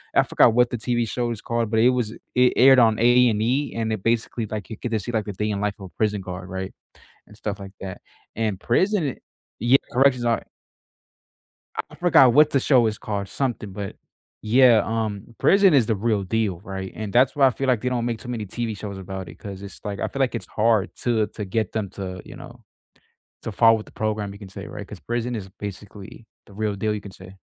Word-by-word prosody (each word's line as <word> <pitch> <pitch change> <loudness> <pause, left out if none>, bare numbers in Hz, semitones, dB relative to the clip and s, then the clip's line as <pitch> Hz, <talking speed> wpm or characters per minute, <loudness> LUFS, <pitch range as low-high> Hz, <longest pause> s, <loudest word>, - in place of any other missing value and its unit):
I - - +6
forgot 115 - +4
what 125 0 +4
the 120 - -3
TV 120 0 -1
show 120 0 -2
is 110 - -5
called, 115 -2 -2
but 110 - +2
it 120 - +6
was 120 -4 -1 0.2
it 125 0 +5
aired 130 0 +7
on 110 -2 +4
A&E 120 +2 +3
and 110 -1 -1
it 100 - -5
basically, 115 -1 0
like, 105 -1 -6
you 110 - -5
get 120 - -4
to 110 - +1
see, 120 - -5
like, 110 -1 -1
a - - -4
day 105 +3 -2
in 100 - -2
the - - -4
life 105 -1 -1
of 95 - -8
a - - -22
prison 105 -2 +1
guard, 90 0 -7
right? 95 0 -5 0.5
And 105 - -16
stuff 105 -2 -4
like 95 -1 -9
that 95 -1 -7 0.4
and 110 -4 -1
prison 185 - +1
i - - -9 0.4
yeah, 120 +4 +5 0.2
corrections 130 -1 +3
are 115 -1 +1 1.5
I - - -13
forgot 145 -8 +5
what 150 +3 +6
the 135 - +2
show 125 -5 +4
is 110 - -2
called, 100 -2 -4
something, 120 -7 -3
but 100 0 -6 0.5
yeah, 115 -1 +5
um, 110 0 -3
prison 195 -4 +5
is 125 -6 +5
the 110 - 0
real 105 -1 0
deal, 100 -3 -1
right? 95 -2 -6
And 105 -2 -5
that's 130 +2 +4
why 140 -2 +5
I - - +5
feel 135 +2 -3
like 125 -4 +2
they 125 - -1
don't 120 -2 -1
make 115 -2 -2
too 125 - -10
many 115 -4 -4
TV 115 +1 -4
shows 100 -1 -6
about 95 -1 -6
it - - -11
'cause 100 -1 -8
it's, 100 - -10
like, 100 -1 -4
I - - -1
feel, 140 - -6
like, 130 -2 +1
it's 115 - -4
hard 110 -2 +1
to, 115 -3 +2
uh, - - +1
to - - -20
to 105 - -4
get 105 +1 -2
them 105 -4 -3
to, 95 -2 -6
you - - -11
know - - -12 0.8
to 110 - -5
follow 115 +2 +5
with 105 - -6
the - - -16
program, 105 -2 -2
you 100 - -11
can 100 -3 -10
say, 95 - -8
right? - - -8
'Cause - - -10
prison 120 0 -2
is 95 -3 -7
basically 100 +2 -9 0.2
the 100 - -16
real 105 -1 -1
deal, 105 +2 -1
you 105 - -4
can 100 - -10
say. 95 0 -13
110 Hz, 245 wpm, -23 LUFS, 100-120 Hz, 1.5 s, aired